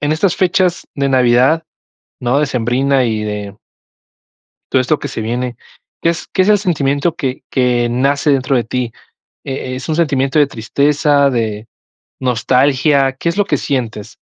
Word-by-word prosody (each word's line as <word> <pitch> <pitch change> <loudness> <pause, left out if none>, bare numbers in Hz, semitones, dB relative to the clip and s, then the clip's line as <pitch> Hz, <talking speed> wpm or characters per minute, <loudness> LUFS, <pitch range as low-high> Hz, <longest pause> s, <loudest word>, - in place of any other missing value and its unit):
en 145 +1 0
estas 175 +3 +1
fechas 180 -1 +1
de 140 -1 0
Navidad, 130 +5 +3 0.6
¿no? 125 +3 +1
Decembrina 130 0 +1
y 110 -2 -1
de 105 -1 -5 1.2
Todo 130 - +4
esto 145 +4 +1
que 145 - -5
se 125 - -5
viene. 120 +2 -3 0.4
¿Qué - - +1
es 170 0 -2
qué 190 - 0
es 185 - +1
el 210 - +6
sentimiento 150 -4 0
que 130 -5 -4
que 125 -2 +1
nace 140 +4 +1
dentro 135 -1 +1
de 120 - +1
ti, 125 0 -3 0.5
eh, 130 -1 -4
es 130 - -7
un 155 - 0
sentimiento 140 -3 +1
de 145 - +5
tristeza, 140 +4 +1
de 110 -3 -2 0.5
nostalgia, 135 +3 +2
qué 170 - 0
es 170 - -5
lo 205 - +2
que - - +1
sientes? 115 -6 -4
135 Hz, 165 wpm, -16 LUFS, 120-150 Hz, 1.2 s, el